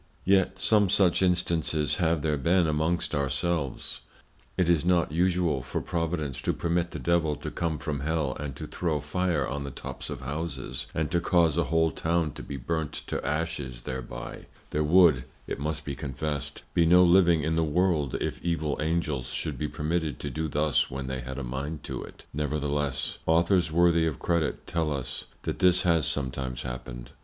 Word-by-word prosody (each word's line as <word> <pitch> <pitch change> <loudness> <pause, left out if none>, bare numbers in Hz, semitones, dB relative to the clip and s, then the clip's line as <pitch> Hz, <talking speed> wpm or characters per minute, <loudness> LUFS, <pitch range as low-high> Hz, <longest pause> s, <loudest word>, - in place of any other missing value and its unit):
Yet 95 0 +3
some 105 +1 +3
such 90 -2 +4
Instances 85 -5 +1
have 80 -3 +1
there 75 -1 +2
been 85 +5 +3
amongst 80 +3 0
our 70 -2 +1
selves. 75 0 -2 0.6
It 90 -2 +2
is 85 -3 +3
not 85 -4 +2
usual 85 -4 +2
for 65 - -3
Providence 80 -5 -2
to - - 0
permit 85 0 0
the - - -6
Devil 85 -3 +1
to - - -6
come 80 -2 -1
from 75 -2 -3
Hell 75 -3 -1
and 70 -3 -5
to - - -6
throw 80 -4 -1
Fire 85 +1 0
on 70 +2 -3
the 70 - -5
tops 65 - -6
of - - -5
Houses, 65 -3 -4
and 80 -1 -1
to 85 - +3
cause 85 -4 +3
a 85 -1 +2
whole 80 +2 +2
Town 80 +1 0
to - - -9
be 70 - -6
burnt 80 +4 -2
to - - -3
Ashes 75 -6 -2
thereby; - - -6 0.2
there 75 - +1
would 80 -5 +5 0.2
(it - - -4
must 75 +1 -3
be 70 - -3
confessed) 70 +2 -4
be 85 - +4
no 90 +2 +7
living 85 -3 +5
in 80 +1 0
the 80 - +2
World, 80 -3 +1
if 60 - -3
evil 80 -3 -1
Angels 80 -5 -1
should 60 - -4
be 75 - -1
permitted 75 -2 -2
to - - -3
do 80 0 -2
thus 75 -1 +1
when 65 +1 -4
they 65 0 -3
had 65 +2 -6
a 70 - -3
mind 70 +5 -4
to - - -5
it; - - -13
nevertheless, 75 -2 -1
Authors 85 +1 +3
worthy 85 0 +4
of 75 - -2
Credit, 85 -3 -1
tell 80 -2 -1
us, 65 -2 -4 0.2
that - - -3
this 90 0 +5
has 85 -3 +3
sometimes 65 -2 -3
happened. - - -7
80 Hz, 185 wpm, -28 LUFS, 70-85 Hz, 0.6 s, no